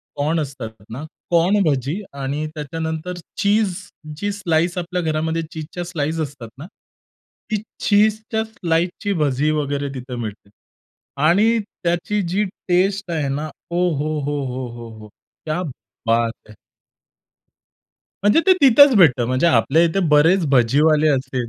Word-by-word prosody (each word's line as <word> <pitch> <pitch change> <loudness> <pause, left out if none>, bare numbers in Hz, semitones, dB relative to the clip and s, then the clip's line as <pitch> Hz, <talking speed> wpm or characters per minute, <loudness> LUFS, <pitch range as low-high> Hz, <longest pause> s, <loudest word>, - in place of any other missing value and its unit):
Corn 155 +3 0
असतात 135 -6 -6 0.2
ना, 130 +7 -7 0.3
corn 180 +5 +3
भजी 145 +4 -1 0.2
आणि 140 +3 -2
त्याच्यानंतर 160 +3 -4 0.2
चीझ 210 +1 +2 0.5
जी 205 +4 -2
स्लाइस, 175 -2 0
आपल्या 180 +1 -2
घरामध्ये 160 +1 -1
चीझच्या 160 +3 -6
स्लाइस 165 -2 -2
असतात 140 -6 -5
ना. 145 - -9 0.9
ती 215 -2 0 0.3
चीझच्या 215 +1 +2
स्लाइसची 180 -1 -1
भजी 145 +2 +1
वगैरे 145 0 -2
तिथे 125 -1 -6
मिळते. 110 -3 -7 0.8
आणि 215 +7 +4 0.3
त्याची 175 +4 0
जी 205 +2 +2 0.2
टेस्ट 190 +1 +1
आहे 155 -4 -1
ना, 150 +3 -3 0.2
ओहोहोहोहोहो! 140 -9 -3 0.4
क्या 155 +3 -1 0.5
बात 115 -1 0
है! 105 - -13 1.7
म्हणजे 205 +11 +5
ते 380 - +8
तिथंच 280 0 +7
भेटतं. 135 -10 +5
म्हणजे 130 +6 +1
आपल्या 160 -1 +4
इथे 170 +3 +1
बरेच 160 +4 +4
भजीवाले 150 +5 +4
असतील. 130 -3 -1
160 Hz, 120 wpm, -20 LUFS, 140-180 Hz, 1.7 s, ते